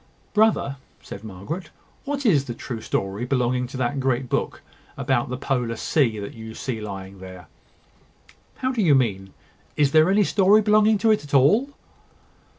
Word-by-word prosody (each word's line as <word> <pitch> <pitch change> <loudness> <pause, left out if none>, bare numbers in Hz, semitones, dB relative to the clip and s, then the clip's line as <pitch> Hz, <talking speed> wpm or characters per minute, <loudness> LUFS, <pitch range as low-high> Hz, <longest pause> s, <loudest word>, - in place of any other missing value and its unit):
"Brother!" 215 -10 +2 0.3
said 100 - -9
Margaret; 110 - -7 0.4
"what 280 -1 -3
is 150 - +3
the 120 -3 -6
true 120 -2 -6
story 100 +2 -3
belonging 125 -1 0
to 130 - -8
that 130 +2 -1
great 130 -1 -1
book - - -2 0.3
about - - 0
the 125 - -3
Polar 125 -4 -2
Sea, 120 -7 +1
that 100 -1 -6
you 110 0 -9
see 120 -4 -4
lying 95 -2 -8
there?" 95 -2 -11 1.1
"How 260 - -2
do 245 -4 -1
you 155 -7 +5
mean? 95 -7 0 0.5
Is 145 -2 +3
there 155 +3 +5
any 205 +2 +4
story 200 +2 +4
belonging 215 +1 +4
to 220 +2 +3
it 215 - +1
at 145 -1 -3
all?" 185 - +4
135 Hz, 165 wpm, -23 LUFS, -, 1.1 s, you